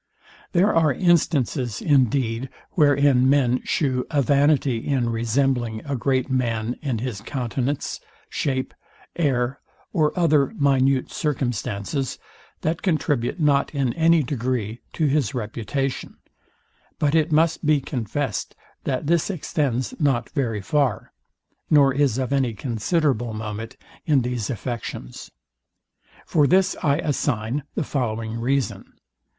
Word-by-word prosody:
There 190 +4 +4
are 160 -3 +4
instances, 140 - +1
indeed, 130 -3 +1 0.2
wherein 140 -4 +4
men 130 -3 +3
shew 130 -4 0
a 145 -3 +2
vanity 140 -2 +3
in 120 0 0
resembling 120 0 0
a 140 -1 -2
great 130 +1 0
man 120 -3 -1
in 135 -6 -1
his 115 -3 -4
countenance, 130 +3 -3 0.3
shape, 130 -2 -2 0.4
air, 135 -5 0 0.3
or 155 -2 +2
other 150 -5 +3
minute 135 -2 +2
circumstances, 130 -3 -2 0.4
that 160 +2 -1
contribute 155 -5 0
not 145 -1 +2
in 135 -4 0
any 165 -1 +4
degree 120 -4 -2
to 160 - 0
his 140 -4 +1
reputation; 125 +4 -3 0.8
but 145 -1 +1
it 160 0 +2
must 160 +2 +2
be 150 -1 +3
confessed 130 -4 -3 0.3
that 130 +1 -1
this 170 +3 +2
extends 140 - -1
not 135 -6 +1
very 115 -8 -1
far, 140 +1 0 0.6
nor 140 -3 +5
is 135 -4 +2
of 130 +1 -1
any 130 -5 +1
considerable 120 - 0
moment 110 +3 -6 0.3
in 140 -5 +3
these 120 -3 -2
affections. 120 - -5 1.0
For 150 -3 +3
this 185 +3 +3
I 140 -1 +2
assign 135 -3 -1
the - - 0
following 115 -5 -2
reason. 135 +2 -1
135 Hz, 120 wpm, -23 LUFS, 120-145 Hz, 1.0 s, nor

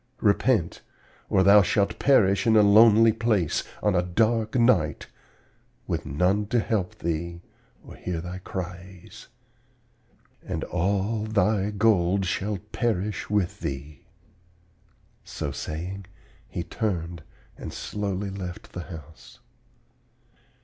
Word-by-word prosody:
Repent, 105 -3 +2 0.5
or 95 - +3
thou 100 +2 +7
shalt 100 +2 0
perish 100 -7 +3
in 110 - +5
a 105 - +7
lonely 110 +2 +6
place, 110 -8 0 0.2
on 105 - +3
a 90 - +3
dark 110 +5 0
night, 115 -10 +2 0.8
with - - -3
none 90 +9 +1
to 120 +3 +1
help 105 -5 -2
thee 85 +1 -3 0.4
or - - -12
hear 90 -2 -4
thy 90 +2 -6
cries; 90 -1 -8 1.2
and - - -4
all 100 +5 -1
thy 105 -1 +1
gold 100 -3 +2
shall 100 +3 -2
perish 105 -4 -2
with 105 -4 0
thee.' 70 +1 -6 1.2
So - - -5
saying, 90 +5 -6 0.4
he 85 - -4
turned 85 -5 -3 0.3
and - - -8
slowly 100 -1 -4
left 90 -2 -7
the 90 - -7
house. 80 -3 -12
95 Hz, 115 wpm, -25 LUFS, 90-105 Hz, 1.2 s, thou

